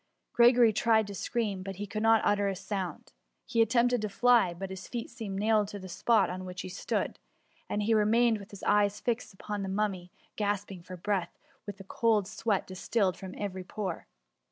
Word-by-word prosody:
Gregory 240 -1 +6
tried 220 0 +3
to 200 - -7
scream, 205 -2 -2
but 195 +1 -6
he 205 +3 -5
could 215 +2 -4
not 225 0 +4
utter 205 -1 +2
a 195 - -1
sound. 190 -1 -5 0.3
He 230 - +1
attempted 240 +1 +3
to 215 - -2
fly, 235 -2 +4
but 190 +2 -6
his 190 -1 -7
feet 235 -1 -5
seemed 220 -5 -5
nailed 210 0 +2
to 205 - -7
the 190 -1 -9
spot 215 +4 +2
on 185 +1 -5
which 185 0 -6
he - - -7
stood, 185 - -2 0.5
and 210 - -1
he 225 +2 +2
remained 225 +1 +3
with 200 - -11
his 200 - -11
eyes 205 0 +2
fixed 235 -2 -2
upon 205 +1 -5
the 195 - -3
Mummy, 190 -3 -2 0.3
gasping 205 -3 -2
for 180 +1 -9
breath, 190 -1 -2 0.3
while 205 -2 -6
a - - -8
cold 210 0 +1
sweat 215 -1 -1
distilled 185 0 0
from 190 -1 -9
every 190 -2 -4
pore. 185 -2 -5
205 Hz, 200 wpm, -30 LUFS, 190-225 Hz, 0.5 s, Gregory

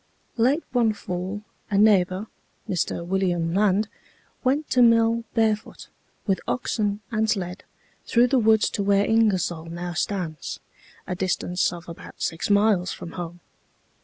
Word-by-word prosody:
"Late 260 +8 +2
one 235 -3 +2
fall 190 +1 -5 0.3
a 200 - +1
neighbor, 195 -2 +4 0.4
Mr. 170 -1 -1
William 175 -3 0
Land, 205 +1 +2 0.6
went 280 +4 +1
to 250 - +4
mill 230 0 +4
barefoot, 220 -2 0 0.4
with 195 -3 0
oxen 210 -4 -1
and 220 -1 +1
sled, 185 -3 -2 0.4
through 240 +1 +4
the 255 +1 +2
woods 220 -1 +3
to 205 - -2
where 200 0 +3
Ingersoll 190 -7 +1
now 175 +1 -5
stands, 175 -5 -3 0.5
a - - -3
distance 180 -1 0
of 175 -1 -9
about 170 - -11
six 165 +4 -2
miles 200 -3 +3
from 170 - -7
home. 175 0 -7
200 Hz, 135 wpm, -24 LUFS, 180-220 Hz, 0.6 s, neighbor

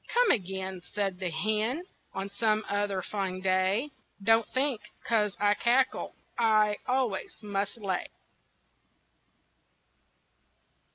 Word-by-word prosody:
"Come 485 -1 +5
again," 190 -3 -2
Said 195 -3 -1
the 185 -2 -1
hen, 220 - 0 0.3
"On 195 0 -2
some 215 +1 +1
other 205 -2 0
fine 190 -2 -2
day. 190 +8 +1 0.3
Don't 225 +2 +5
think 260 -4 0 0.2
'cause 210 -3 +1
I 205 0 +4
cackle 250 +4 +1 0.2
I 215 -2 +4
always 250 -6 0
must 205 +1 -2
lay." 195 -5 -2
205 Hz, 105 wpm, -29 LUFS, 195-230 Hz, 0.3 s, Come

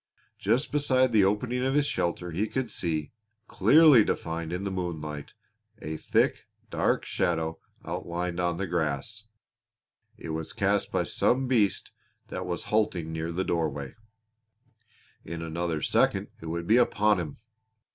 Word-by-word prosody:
Just 115 +8 +1
beside 130 -3 +3
the 110 -3 +5
opening 120 +6 0
of 135 +1 +1
his 145 -1 +3
shelter 90 -7 -2
he 100 +7 -1
could 125 -1 -3
see, 80 -6 -2 0.4
clearly 125 +4 +6
defined 80 -3 -3
in 90 +2 -3
the 100 - -2
moonlight, 80 -5 -5 0.4
a 80 +1 -5
thick, - - +1 0.2
dark - - +1
shadow 80 -1 -1 0.3
outlined 85 +1 -3
on 85 -1 0
the 100 - -2
grass. 85 - -2 0.9
It - - -8
was 80 0 -4
cast - - +1
by - - +1
some 130 +1 +1
beast 110 -7 +1 0.4
that 90 0 -5
was 85 -1 -3
halting 90 -7 +1
near 80 +1 -3
the 90 +3 -1
doorway. 75 -5 -2 1.3
In 85 +1 -6
another 80 -1 -2
second - - +2
it 80 - -7
would 85 +1 -3
be 110 +6 +5
upon 105 -4 +3
him. 75 -5 -5
90 Hz, 145 wpm, -28 LUFS, 80-110 Hz, 1.3 s, clearly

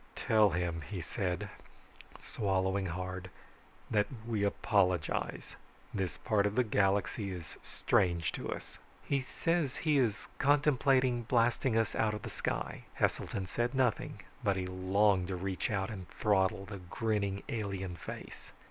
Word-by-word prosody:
"Tell 110 -2 +4
him," 85 -2 -1
he 100 -3 -3
said, 90 0 -2 0.7
swallowing 95 -1 0
hard, 90 +1 -4 0.6
"that 105 -2 +3 0.2
we 110 -3 0
apologize. 95 -5 +1 0.4
This 95 -6 -2
part 105 -3 +2
of 100 - -3
the 125 - +4
galaxy 100 -1 +1
is 90 -4 -7
strange 85 -4 +1
to - - -5
us." - - -7 0.2
"He 140 -1 +1
says 160 +1 0
he 150 -3 +2
is 110 -6 0
contemplating 135 -3 +3
blasting 120 0 +2
us 115 - +1
out 105 -1 +1
of 105 - -7
the - - -5
sky." - - -3
Heselton 95 - 0
said 120 +6 -1
nothing, 130 -4 +1 0.2
but 100 - +2
he 95 -1 -2
longed 95 +1 +2
to 95 - -2
reach 95 +1 -2
out 95 -1 -1
and 95 -4 -7
throttle 95 -3 +1
the 100 +1 -7
grinning, 100 +1 -1
alien 95 -5 -3
face. 85 - -9
100 Hz, 140 wpm, -33 LUFS, 95-115 Hz, 0.7 s, Tell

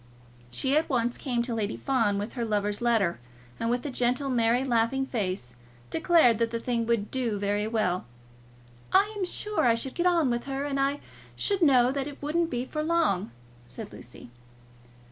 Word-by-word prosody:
She 265 - +1
at 310 +1 +2
once 240 -3 0
came 245 -4 -1
to 240 -1 -3
Lady 215 -2 -2
Fawn 230 -7 +1
with 205 +3 -4
her 240 - -3
lover's 210 -1 -1
letter, 225 - +2 0.4
and 230 - -1
with 245 +2 -1
a 290 - -2
gentle 250 +3 0
merry 235 +1 +2
laughing 250 +1 +1
face 185 - -3 0.4
declared 320 -9 +4
that 230 0 +1
the 230 0 -3
thing 230 -1 -1
would 230 -3 0
do 240 -5 -1
very 205 +1 0
well. 210 -5 0 0.9
"I 400 +3 +4
am 395 -3 -1
sure 420 +3 -1
I 230 - +5
should 255 +3 -4
get 350 +1 +1
on 335 -7 +3
with 240 0 -2
her, 275 +1 -3
and 275 -1 -2
I 280 +1 0 0.3
should 400 -2 0
know 255 -5 +5
that 275 0 -2
it 290 -1 -9
wouldn't 325 +3 0
be 245 -2 -2
for 305 +3 -3
long," 315 - +1 0.4
said - - -9
Lucy. 120 - -11
245 Hz, 185 wpm, -27 LUFS, 225-280 Hz, 0.9 s, I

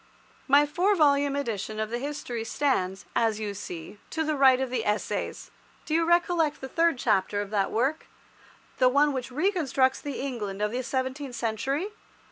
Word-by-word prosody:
My 285 +2 +6
four 360 +8 +2
volume 285 -3 +3
edition 220 -6 -3
of 215 0 -2
the 240 - -2
History 255 -4 -4
stands, 195 -7 -1
as 225 -2 +2
you 210 -2 -3
see, 185 -1 -8
to 320 - -1
the 310 -1 0
right 265 -2 +6
of 265 -2 -2
the 240 -3 -1
Essays. 210 0 -2 0.3
Do 310 - -3
you 330 +1 +3
recollect 345 -2 +2
the 265 - -6
third 330 +1 +2
chapter 195 -3 +1
of 205 0 -4
that 200 -2 +1
work—the 255 0 -2
one 285 +2 +3
which 255 -3 -4
reconstructs 275 -4 +1
the 285 -2 -5
England 220 -8 -4
of 210 0 0
the 250 +2 -2
seventeenth 260 +1 -3
century? 255 - -1
260 Hz, 170 wpm, -27 LUFS, 220-295 Hz, 0.3 s, My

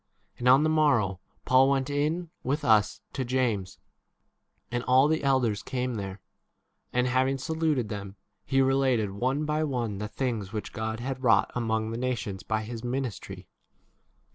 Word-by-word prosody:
And 125 - -1
on 135 +3 +7
the - - +3
morrow 130 - +2 0.3
Paul 130 +1 +5
went 135 -1 +1
in 155 +4 -1
with 145 +4 -2
us 105 -4 +3
to 135 - -2
James, 120 -7 -1 0.9
and 120 0 -1
all 130 +2 +5
the 160 -1 0
elders 125 -7 +2
19 - - -13
came 125 -1 -1
there. 100 -1 -5 0.7
And 125 0 +1
having 130 +2 +1
saluted 155 -5 -1
them, 100 -2 -6 0.3
he 135 -1 +2
related 130 -6 +2
one 130 +9 -1
by 150 +1 0
one 120 -8 -2
the 105 - -3
things 115 -5 -3
which 110 -1 -5
God 110 +1 -3
had 130 +1 -4
wrought 115 -6 +3
among 110 -2 -1
the 115 - -4
nations 110 -7 -2
by 110 0 -2
his 115 +1 -7
ministry. 125 -2 -4
125 Hz, 165 wpm, -28 LUFS, 110-135 Hz, 0.9 s, on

